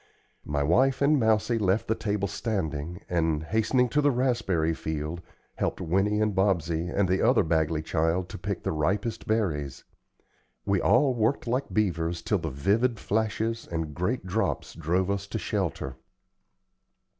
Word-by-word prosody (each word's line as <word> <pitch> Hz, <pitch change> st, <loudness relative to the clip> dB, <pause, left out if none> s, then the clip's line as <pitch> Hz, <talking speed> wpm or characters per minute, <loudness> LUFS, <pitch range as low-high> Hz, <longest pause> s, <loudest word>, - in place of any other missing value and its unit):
My 75 Hz, 0 st, 0 dB
wife 130 Hz, -, +3 dB
and 145 Hz, +1 st, +4 dB
Mousie 110 Hz, +1 st, +2 dB
left 100 Hz, +1 st, +1 dB
the 110 Hz, -, +2 dB
table 105 Hz, -2 st, -1 dB
standing, 90 Hz, -6 st, -3 dB
and, 80 Hz, -3 st, 0 dB
hastening 110 Hz, +7 st, +2 dB
to 150 Hz, -, +2 dB
the 145 Hz, -, +4 dB
raspberry 115 Hz, -, +1 dB
field, 80 Hz, +2 st, -4 dB, 0.4 s
helped -, -, -1 dB
Winnie 95 Hz, +5 st, +1 dB
and 110 Hz, -1 st, +1 dB
Bobsey 85 Hz, -3 st, +1 dB
and 100 Hz, -1 st, +1 dB
the 95 Hz, +1 st, +1 dB
other 125 Hz, -2 st, +4 dB
Bagley 80 Hz, -1 st, 0 dB
child 80 Hz, +3 st, 0 dB
to -, -, -7 dB
pick 100 Hz, 0 st, -4 dB
the -, -, -1 dB
ripest 95 Hz, +9 st, -1 dB
berries. 80 Hz, -, -1 dB, 0.8 s
We 100 Hz, -1 st, +1 dB
all 130 Hz, +1 st, +4 dB
worked 115 Hz, +3 st, 0 dB
like 125 Hz, +4 st, -1 dB
beavers 85 Hz, -5 st, 0 dB
till 105 Hz, -, +1 dB
the 80 Hz, -1 st, -3 dB
vivid 105 Hz, -, +1 dB
flashes 110 Hz, +2 st, -1 dB
and 80 Hz, -3 st, -3 dB
great 95 Hz, -, -2 dB
drops 100 Hz, +5 st, -1 dB
drove 90 Hz, +4 st, 0 dB
us 100 Hz, 0 st, -3 dB
to -, -, -3 dB
shelter. 65 Hz, 0 st, -3 dB
95 Hz, 155 wpm, -27 LUFS, 80-110 Hz, 0.8 s, and